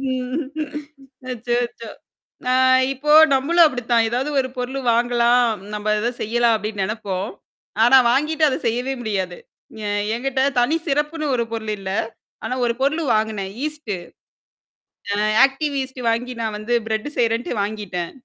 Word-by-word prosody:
ம். 260 Hz, +1 st, -2 dB, 0.9 s
அச்சோ! 240 Hz, -1 st, -2 dB
அச்சோ! 230 Hz, -1 st, -11 dB, 0.6 s
அ, -, -, +3 dB, 0.4 s
இப்போ 290 Hz, +3 st, -1 dB, 0.2 s
நம்மளும் 330 Hz, +6 st, +4 dB
அப்படித்தான். 240 Hz, -3 st, +1 dB
ஏதாவது, 255 Hz, +5 st, -1 dB
ஒரு 260 Hz, -, -1 dB
பொருளு 255 Hz, +2 st, -3 dB
வாங்கலாம், 240 Hz, +1 st, +3 dB, 0.3 s
நம்ம 210 Hz, 0 st, -1 dB
ஏதது 230 Hz, +3 st, 0 dB
செய்யலாம் 235 Hz, +1 st, +2 dB
அப்படின்னு 210 Hz, -2 st, -3 dB
நெனைப்போம். 205 Hz, -1 st, -4 dB, 0.5 s
ஆனா 245 Hz, +3 st, +7 dB
வாங்கிட்டு 305 Hz, +4 st, +1 dB
அத 260 Hz, -, -1 dB
செய்யவே 245 Hz, +4 st, -1 dB
முடியாது. 190 Hz, -5 st, -2 dB, 0.5 s
எ -, -, -1 dB, 0.3 s
என்கிட்ட 265 Hz, +3 st, -1 dB, 0.2 s
தனி 245 Hz, +6 st, +3 dB
சிறப்புன்னு 300 Hz, +2 st, -1 dB
ஒரு 235 Hz, -, +1 dB
பொருள் 220 Hz, -2 st, -3 dB
இல்ல. 190 Hz, -1 st, -5 dB, 0.5 s
ஆனா, -, -, -2 dB
ஒரு 235 Hz, -, +1 dB
பொருளு 300 Hz, +4 st, +1 dB
வாங்குனேன். 215 Hz, -3 st, -2 dB
ஈஸ்ட்டு. 300 Hz, -9 st, -3 dB, 1.2 s
அ, -, -, 0 dB, 0.3 s
ஆக்டிவ் 285 Hz, +2 st, -2 dB
ஈஸ்ட் 260 Hz, -1 st, -7 dB
வாங்கி 245 Hz, +2 st, -1 dB
நான் 220 Hz, -2 st, -2 dB
வந்து 215 Hz, +3 st, -3 dB
பிரட் 220 Hz, +5 st, -2 dB
செய்றேன்டு 230 Hz, 0 st, 0 dB
வாங்கிட்டேன். 200 Hz, -5 st, -4 dB
240 Hz, 140 wpm, -21 LUFS, 220-265 Hz, 1.2 s, ஆனா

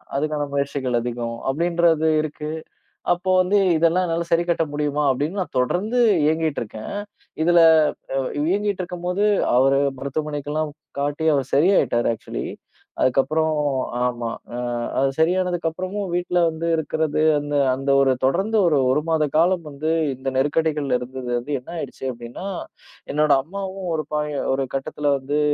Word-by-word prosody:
அதுக்கான 150 Hz, +1 st, -1 dB
முயற்சிகள் 140 Hz, -3 st, -1 dB
அதிகம் 120 Hz, -1 st, -4 dB
அப்டின்றது 165 Hz, +1 st, +2 dB
இருக்கு. 150 Hz, 0 st, -5 dB, 0.6 s
அப்போ 180 Hz, +2 st, -1 dB
வந்து 185 Hz, +3 st, +3 dB, 0.2 s
இதெல்லாம் 165 Hz, +3 st, +3 dB
என்னால 170 Hz, 0 st, -1 dB
சரி 170 Hz, 0 st, +3 dB
கட்ட 165 Hz, -1 st, +2 dB
முடியுமா 150 Hz, 0 st, -1 dB
அப்டின்னு 150 Hz, +9 st, -1 dB
நான் 180 Hz, -, -5 dB
தொடர்ந்து 195 Hz, -, +1 dB, 0.2 s
இயங்கிட்டு 160 Hz, 0 st, +1 dB
இருக்கேன். 110 Hz, -1 st, -7 dB, 0.5 s
இதுல 175 Hz, +1 st, +5 dB, 0.9 s
இயங்கிட்டு 200 Hz, 0 st, 0 dB
இருக்கும்போது 180 Hz, +2 st, -2 dB, 0.3 s
அவர 135 Hz, +2 st, +4 dB, 0.2 s
மருத்துவமனைக்கெல்லாம் 150 Hz, +2 st, -3 dB, 0.3 s
காட்டி 145 Hz, +3 st, -1 dB
அவரு 135 Hz, -3 st, 0 dB
சரியாயிட்டாரு 150 Hz, -7 st, +3 dB
ஆக்சுவலி. 110 Hz, -, -6 dB, 0.5 s
அதுக்கப்பறம் 155 Hz, +5 st, +2 dB, 0.5 s
ஆமா. 120 Hz, -1 st, -2 dB, 0.3 s
ம். 120 Hz, -1 st, -2 dB, 0.2 s
அவரு 135 Hz, 0 st, +2 dB
சரியானதுக்கப்பறமும் 180 Hz, +3 st, 0 dB
வீட்ல 180 Hz, 0 st, 0 dB
வந்து 160 Hz, +1 st, -4 dB
இருக்குறது 155 Hz, -1 st, -1 dB, 0.2 s
அந்த 145 Hz, 0 st, -4 dB, 0.2 s
அந்த 135 Hz, +1 st, -2 dB
ஒரு 135 Hz, -1 st, +4 dB
தொடர்ந்து 190 Hz, +11 st, +1 dB
1- 155 Hz, -4 st, +3 dB
1 135 Hz, -, +3 dB
மாதகாலம் 165 Hz, +3 st, +2 dB
வந்து 150 Hz, +3 st, -3 dB, 0.2 s
இந்த 130 Hz, +1 st, -6 dB
நெருக்கடிகள்ல 145 Hz, -1 st, +1 dB
இருந்தது 125 Hz, 0 st, -6 dB
வந்து 140 Hz, +4 st, -3 dB
என்ன 125 Hz, -, -13 dB
ஆயிடுச்சு 140 Hz, -3 st, -7 dB
அப்டின்னா, 120 Hz, +9 st, -8 dB, 0.7 s
என்னோட 150 Hz, 0 st, +3 dB
அம்மாவும் 190 Hz, +2 st, -5 dB
ஒரு 155 Hz, -1 st, -1 dB
பாய 150 Hz, -1 st, -1 dB, 0.2 s
ஒரு 135 Hz, 0 st, -1 dB
கட்டத்துல 145 Hz, +1 st, -1 dB
வந்து 145 Hz, +3 st, -1 dB
150 Hz, 130 wpm, -22 LUFS, 135-170 Hz, 0.9 s, இதுல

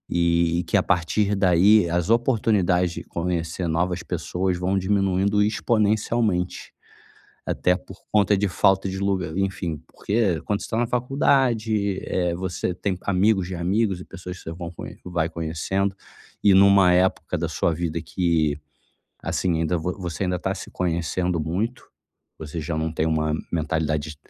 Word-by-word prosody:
E 85 Hz, 0 st, +2 dB
que, 85 Hz, -, 0 dB
a 95 Hz, -, +2 dB
partir 100 Hz, +3 st, +1 dB
daí, 95 Hz, +1 st, +4 dB
as 85 Hz, +2 st, 0 dB
oportunidades 105 Hz, -7 st, +2 dB
de -, -, -6 dB
conhecer 85 Hz, 0 st, -2 dB
novas 85 Hz, +2 st, -1 dB
pessoas 90 Hz, 0 st, -2 dB
vão 95 Hz, +2 st, 0 dB
diminuindo 100 Hz, +1 st, +1 dB
exponencialmente, 105 Hz, -3 st, 0 dB, 0.7 s
até 90 Hz, -, +2 dB
por 95 Hz, -, -12 dB, 0.2 s
conta 105 Hz, -1 st, +4 dB
de 100 Hz, +1 st, +1 dB
falta 95 Hz, +1 st, +2 dB
de 95 Hz, 0 st, -4 dB
lugar, 95 Hz, -4 st, -1 dB
enfim. 95 Hz, -5 st, -2 dB
Porque, 100 Hz, -6 st, 0 dB
quando 105 Hz, 0 st, -1 dB
você -, -, -7 dB
tá 110 Hz, -, -2 dB
na 120 Hz, -, +2 dB
faculdade, 120 Hz, -5 st, +1 dB
eh, 90 Hz, -2 st, -1 dB
você 90 Hz, 0 st, -3 dB
tem 95 Hz, +1 st, -2 dB
amigos 95 Hz, -1 st, +2 dB
de 95 Hz, -, -5 dB
amigos 95 Hz, +3 st, 0 dB
e -, -, -8 dB
pessoas 90 Hz, -1 st, -8 dB
que -, -, -15 dB
você 80 Hz, -, -5 dB
vão 85 Hz, 0 st, -6 dB
con -, -, -8 dB
que -, -, -11 dB
vai 85 Hz, -2 st, 0 dB
conhecendo. 85 Hz, +5 st, -2 dB, 0.5 s
E 100 Hz, -2 st, +6 dB
numa 100 Hz, -1 st, +6 dB
época 90 Hz, -1 st, +1 dB
da 85 Hz, +1 st, -2 dB
sua 80 Hz, +2 st, 0 dB
vida 85 Hz, 0 st, -2 dB
que, 80 Hz, -4 st, 0 dB, 0.6 s
assim, 85 Hz, +1 st, 0 dB
ainda 85 Hz, +1 st, 0 dB
vo 90 Hz, +3 st, -2 dB
você 90 Hz, +1 st, -3 dB
ainda 90 Hz, -1 st, -1 dB
tá 95 Hz, +2 st, -2 dB
se 95 Hz, -, -8 dB
conhecendo 85 Hz, 0 st, -1 dB
muito, 100 Hz, +11 st, -2 dB, 0.5 s
você 80 Hz, +1 st, -6 dB
já 80 Hz, +1 st, -3 dB
não 80 Hz, 0 st, -2 dB
tem 80 Hz, 0 st, 0 dB
uma 80 Hz, -1 st, 0 dB, 0.2 s
mentalidade 80 Hz, -2 st, -1 dB
d -, -, -16 dB
90 Hz, 165 wpm, -24 LUFS, 85-100 Hz, 0.7 s, E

